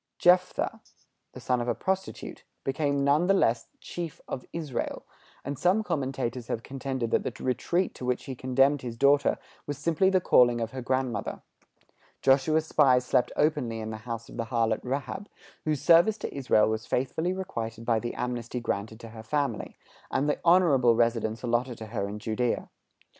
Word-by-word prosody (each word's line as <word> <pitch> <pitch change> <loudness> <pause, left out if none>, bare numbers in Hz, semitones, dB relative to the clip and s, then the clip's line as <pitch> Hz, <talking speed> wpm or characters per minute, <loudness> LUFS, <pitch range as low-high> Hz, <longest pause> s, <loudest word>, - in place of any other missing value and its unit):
Jephtha, 180 +1 +3 0.5
the - - -9
son 125 -1 0
of 120 - -3
a 120 - +1
prostitute, 190 0 -3 0.2
became 140 0 0
none 145 +5 +3
the 195 - +4
less 115 -10 +2
chief 170 -3 -6
of 125 - -6
Israel; 155 -7 -4 0.4
and 140 0 -4
some 195 +5 +3
commentators 130 - -2
have 115 - -3
contended 130 -3 -3
that - - +3
the - - -6
retreat 170 +9 0
to - - -10
which 125 0 -1
he 135 - -5
condemned 135 +3 +2
his 120 -2 -6
daughter 140 +2 +4 0.3
was 145 -1 -3
simply 170 +5 +2
the 190 -1 +3
calling 120 -8 +4
of 115 -1 -3
her 130 - -5
grandmother. 130 -2 -2 0.8
Joshua's 140 +4 +3
spies 130 -5 +4
slept 125 -1 +2
openly 145 -7 +1
in 110 0 -5
the 110 - -5
house 115 0 -6
of - - -11
the 115 - -2
harlot 115 -2 +1
Rahab, 140 +10 -4 0.4
whose 155 -3 -1
service 175 +6 +6
to - - -5
Israel 125 -6 +3
was 110 0 -2
faithfully 145 +7 0
requited 115 -13 -5
by 115 -2 +2
the 120 +1 -5
amnesty 125 0 -3
granted 110 -1 -3
to 115 - -9
her 110 0 -10
family, 140 +5 -2 0.3
and 135 +2 0
the 150 - 0
honorable 160 -9 +5
residence 115 -1 0
allotted 120 0 0
to 110 - -7
her 100 -2 -3
in 105 - -5
Judæa. 115 +3 -1
130 Hz, 175 wpm, -28 LUFS, 115-150 Hz, 0.8 s, service